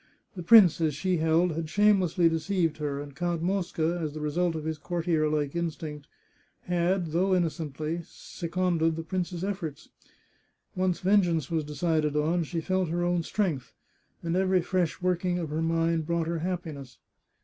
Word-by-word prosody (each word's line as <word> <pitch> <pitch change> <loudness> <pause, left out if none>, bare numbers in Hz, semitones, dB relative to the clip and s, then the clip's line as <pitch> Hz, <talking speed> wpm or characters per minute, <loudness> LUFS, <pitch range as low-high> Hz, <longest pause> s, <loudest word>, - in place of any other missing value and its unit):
The 180 - -5
prince, 175 -4 +7
as 155 -3 +1
she 185 +4 0
held, 165 +2 +2
had 160 0 -4
shamefully 190 -3 +3
deceived 165 0 0
her, 145 -2 -3
and 145 -1 -8
Count 175 0 -2
Mosca, 175 -2 0
as 155 -2 -3
the - - -4
result 165 +3 0
of 155 - -4
his 160 -1 -3
courtier 165 -2 0
like 150 0 -1
instinct, 155 -3 -4 0.5
had, 175 -1 0
though 185 +3 +2
innocently, 160 -1 -2
seconded 170 -1 -1
the 165 - -5
prince's 180 +1 -3
efforts. 185 -7 -4 0.9
Once 185 -1 0
vengeance 180 -5 +2
was 160 -2 0
decided 150 0 0
on, 165 +3 +1
she 165 +1 -3
felt 185 0 0
her 175 +2 -1
own 175 0 +1
strength, 165 -7 -2 0.5
and 170 0 -1
every 185 -1 +2
fresh 180 -1 -1
working 180 0 +1
of 165 -4 -4
her 155 +1 -1
mind 165 -1 +1
brought 170 -1 0
her 165 0 -2
happiness. 155 - -5
170 Hz, 160 wpm, -28 LUFS, 155-180 Hz, 0.9 s, prince